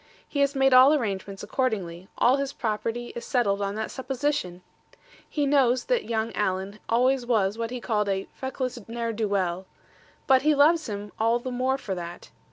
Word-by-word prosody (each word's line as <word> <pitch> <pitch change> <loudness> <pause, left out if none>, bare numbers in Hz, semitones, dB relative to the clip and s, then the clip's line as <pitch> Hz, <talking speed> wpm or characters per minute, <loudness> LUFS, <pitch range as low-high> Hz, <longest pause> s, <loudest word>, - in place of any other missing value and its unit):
He 285 - -4
has 280 0 +2
made 270 -1 +4
all 260 +4 +8
arrangements 200 -6 -3
accordingly: 195 -7 -2
all 255 +3 +4
his 275 0 -3
property 230 +1 -3
is 235 - -5
settled 205 -7 +1
on 200 0 -2
that 220 0 -3
supposition. 260 -9 -2 0.7
He 295 -2 0
knows 260 -3 +3
that - - 0
young 225 0 -1
Alan 195 +1 -2
always 255 +3 +3
was 215 -5 +1
what 230 0 -3
he 250 +1 -5
calls 210 -3 0
a 195 -1 -1
"feckless 260 -2 -4
ne'er 230 0 -3
do 220 0 -1
weel;" 185 -2 -1 0.6
but 265 -1 +5
he 305 +1 +3
loves 310 +1 +4
him 205 0 -5
all 230 +2 +3
the 255 +1 -5
more 255 +2 0
for 205 -7 -5
that. 175 -1 -7
235 Hz, 180 wpm, -26 LUFS, 200-265 Hz, 0.7 s, all